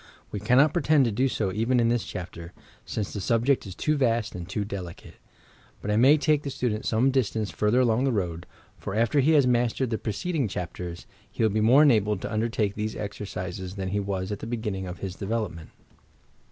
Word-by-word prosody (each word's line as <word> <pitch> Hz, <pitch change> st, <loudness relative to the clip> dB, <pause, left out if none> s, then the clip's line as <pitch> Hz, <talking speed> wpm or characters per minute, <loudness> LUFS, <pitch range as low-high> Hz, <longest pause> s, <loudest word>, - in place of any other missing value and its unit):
We 105 Hz, -, -3 dB
cannot 125 Hz, +9 st, +4 dB
pretend 155 Hz, -4 st, +3 dB
to 115 Hz, -, 0 dB
do 125 Hz, +6 st, +1 dB
so 100 Hz, -7 st, -1 dB
even 115 Hz, +5 st, +1 dB
in 115 Hz, -1 st, +3 dB
this 120 Hz, -1 st, +1 dB
chapter, 85 Hz, -1 st, -7 dB, 0.2 s
— -, -, -28 dB
since 105 Hz, -3 st, -3 dB
the 105 Hz, -, -4 dB
subject 115 Hz, +3 st, +1 dB
is 95 Hz, -, -8 dB
too 155 Hz, +9 st, 0 dB
vast 115 Hz, -4 st, +1 dB
and 90 Hz, 0 st, -7 dB
too 100 Hz, +1 st, -2 dB
delicate. 95 Hz, -4 st, -7 dB, 0.7 s
But 105 Hz, -, -3 dB
I -, -, +2 dB
may 135 Hz, +7 st, +6 dB
take 150 Hz, 0 st, +2 dB
the 145 Hz, -, -4 dB
student 115 Hz, -5 st, -2 dB
some 120 Hz, +5 st, +3 dB
distance 110 Hz, -5 st, 0 dB
further 105 Hz, +4 st, +2 dB
along 120 Hz, +1 st, +2 dB
the 135 Hz, -, +2 dB
road, 90 Hz, -6 st, -2 dB, 0.2 s
— -, -, -32 dB
for, 100 Hz, -, -5 dB
after 115 Hz, +6 st, +3 dB
be 155 Hz, +5 st, +4 dB
has 145 Hz, -4 st, +5 dB
mastered 125 Hz, 0 st, +1 dB
the 110 Hz, -, -1 dB
preceding 140 Hz, -, -2 dB
chapters, 90 Hz, -2 st, -6 dB, 0.2 s
he -, -, -2 dB
will 110 Hz, -, +3 dB
be 110 Hz, +1 st, +1 dB
more 125 Hz, +7 st, +6 dB
enabled 105 Hz, -8 st, +3 dB
to -, -, -4 dB
undertake 110 Hz, -2 st, 0 dB
these 110 Hz, +1 st, -3 dB
exercises 95 Hz, -3 st, -5 dB
than 95 Hz, -2 st, -3 dB
he 100 Hz, +2 st, -1 dB
was 95 Hz, -1 st, -3 dB
at 105 Hz, -, -4 dB
the -, -, -7 dB
beginning 105 Hz, -5 st, -3 dB
of 90 Hz, 0 st, -6 dB
his 95 Hz, -1 st, -5 dB
de 100 Hz, -, -5 dB
velopment. 100 Hz, -8 st, -3 dB
110 Hz, 220 wpm, -26 LUFS, 95-125 Hz, 0.7 s, may